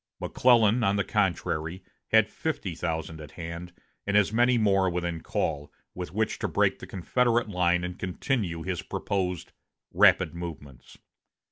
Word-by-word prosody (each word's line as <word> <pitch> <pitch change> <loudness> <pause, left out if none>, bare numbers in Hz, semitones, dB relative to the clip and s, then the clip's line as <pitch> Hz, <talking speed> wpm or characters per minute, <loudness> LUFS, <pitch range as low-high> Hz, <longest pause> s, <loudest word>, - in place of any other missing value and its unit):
McClellan, 120 -2 +3
on 100 -1 +2
the 100 - +1
contrary, 90 -3 -1 0.2
had 110 -1 +5
fifty 145 - -3
thousand 80 -1 -4
at 75 -1 -11
hand, 85 +1 -7 0.4
and 100 0 +3
as 105 +1 +3
many 120 +2 +4
more 95 -4 +3
within 85 -1 -3
call, 75 -2 -2 0.2
with 90 -3 -6
which 110 +3 -1
to - - -1
break - - +1
the - - -9
Confederate 120 +5 +1
line 90 -2 +1
and 90 0 -5
continue 95 - -2
his 90 -2 -3
proposed 90 -3 -3 0.4
"rapid - - +5
movements." 80 -6 -9
90 Hz, 145 wpm, -27 LUFS, 85-105 Hz, 0.4 s, had